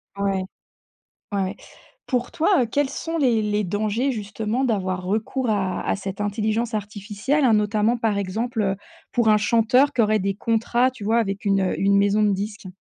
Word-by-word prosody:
Ouais. 195 -1 -1 0.9
Ouais. 195 0 -1 0.5
Pour 250 -2 -1
toin 335 -1 +2
heu, - - 0
quels 275 +4 0
sont 330 +3 -4
les 245 -6 +3
les 210 0 0
dangers 215 +7 0
justement 220 +3 -2
d'avoir 185 -6 -1
recours 220 +6 -1
à 190 -3 0
à - - -1
cette 195 0 -6
intelligence 220 +3 -1
artificielle, 210 +7 -2
hein, 235 -4 +5
notamment 210 +2 +2
par 225 -4 0
exemple, 220 +5 -2
heu, 195 -1 0 0.4
pour 235 -2 +2
un 215 - +6
chanteur 230 +6 +3
qui 240 - +2
aurait 215 0 +2
des 195 0 -1
contrats, 230 +4 +1
tu 255 -4 -13
vois? 225 +3 +2
Avec 200 -3 -2
une, 195 -1 +3
heu, 190 - -1
une 200 0 +3
maison 200 +1 +3
de 205 -1 +3
disque. 205 +1 -4
215 Hz, 185 wpm, -23 LUFS, 200-235 Hz, 0.9 s, un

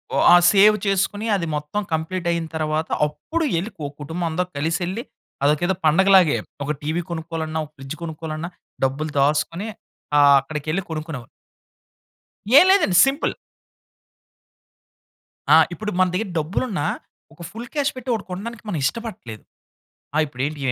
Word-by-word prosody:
ఒ - - +1
ఆహ్, 175 0 +7
సేవ్ 210 +2 +6
చేసుకొని. 195 +2 0
అది 180 -4 -1
మొత్తం 150 +8 -3
కంప్లీట్ 170 +3 -2
అయిన 170 -1 -1
తర్వాత 155 0 -1 0.2
అప్పుడు 325 - -4
యెళ్ళి, 185 +7 -2
ఒక 140 - -5
కుటుంబం 165 +4 -4
అందరు 180 +3 -2
కలిసెళ్లి 175 +8 -2 0.4
అదొకేదో 155 +6 +2
పండగలాగే. 185 0 +5 0.3
ఒక 145 - -2
టీవీ 155 +4 -1
కొనుక్కోవాలన్నా, 160 -1 -4
ఒక 150 - -19
ఫ్రిడ్జ్ 135 +2 -7
కొనుక్కోవాలన్నా 160 0 -5 0.4
డబ్బులు 145 +4 -2
దాసుకొని 155 +7 0 0.5
ఆహ్, 140 -1 +7
అక్కడికెళ్ళి 155 +6 -3
కొనుక్కునేవా 155 -6 -5 1.3
ఏం - - +6
లేదండి 265 - +4
సింపుల్. 275 +2 0 2.2
ఆ! - - +9 0.2
ఇప్పుడు 210 +3 -4
మన 185 - +5
దెగ్గిర 195 +3 -2
డబ్బులున్నా 180 - -2 0.5
ఒక 160 - -16
ఫుల్ 235 +2 -8
క్యాష్ 290 -2 +1
పెట్టి 255 0 -7
ఒకటి 220 -3 -3
కొనడానికి 215 +5 -6
మనం 180 - -2
ఇష్టపడట్లేదు. 180 - -5 0.7
ఆ! - - +1
ఇప్పుడు 130 -3 -6
ఏంటి 150 0 -6
170 Hz, 135 wpm, -22 LUFS, 155-195 Hz, 2.2 s, ఆ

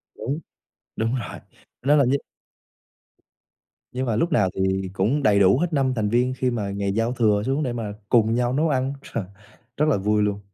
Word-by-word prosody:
Đúng, 140 +6 -3 0.6
đúng 115 +3 0
rồi, 120 -5 -5 0.4
nên 145 +3 +4
là 140 - +5
như 130 +3 +2 1.8
Nhưng 130 +1 -2
mà 115 -3 0
lúc 170 +9 0
nào 95 -3 +3
thì 95 0 -1
cũng 115 +10 0
đầy 100 -5 +4
đủ 95 +5 +5
hết 175 -1 -1
5 135 -2 +2
thành 105 -2 0
viên 125 +2 +2
khi 125 -1 0
mà 105 -4 -2
ngày 100 0 -2
giao 115 +3 0
thừa 105 -4 +2
xuống 135 +3 0
để 125 -3 -2
mà 110 -3 -4 0.2
cùng 115 -1 +3
nhau 125 0 +1
nấu 155 +3 +1
ăn, 135 0 0
trời, 115 - -4 0.5
rất 150 - +3
là 140 - +3
vui 105 +2 +1
luôn! 100 -1 -1
120 Hz, 200 wpm, -23 LUFS, 105-130 Hz, 1.8 s, là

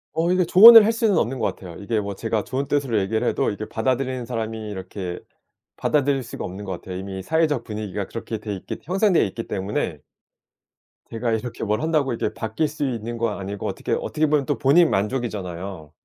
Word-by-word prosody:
어 165 +2 +1
이게 180 -1 +3
조언을 220 +5 +10
할 220 - +3
수는 225 -4 +1
없는 130 +4 0
것 110 - -1
같아요. 90 -3 -10
이게 110 +2 -1
뭐 100 -1 -4
제가 110 +1 -2
좋은 135 +2 -3
뜻으로 135 -7 +1
얘기를 110 +5 -1
해도 - - +1
이게 105 +1 -5
받아들이는 130 +2 -1
사람이 110 -2 -4
이렇게 95 -2 -6 0.6
받아들일 140 -2 +1
수가 120 - -7
없는 95 +3 -7
것 95 - -4
같아요. 90 -1 -7
이미 95 0 -6
사회적 155 - +1
분위기가 105 -3 -5
그렇게 115 -1 -5
돼 105 -1 -5
있기 95 - -7
형성되어 190 0 +3
있기 115 +3 -3
때문에 100 +1 -2 1.1
제가 115 +1 -2
이렇게 115 +1 -3
뭘 105 +1 0
한다고 155 -5 +1
이렇게 115 - -2
바뀔 110 +8 -2
수 150 0 -3
있는 115 -1 -4
건 115 -2 -1
아니고 100 0 -5
어떻게 - - -5
어떻게 155 - 0
보면 145 -2 +2
또 145 - -1
본인 155 +5 +5
만족이잖아요. 95 - -3
115 Hz, 440 characters per minute, -23 LUFS, 100-140 Hz, 1.1 s, 조언을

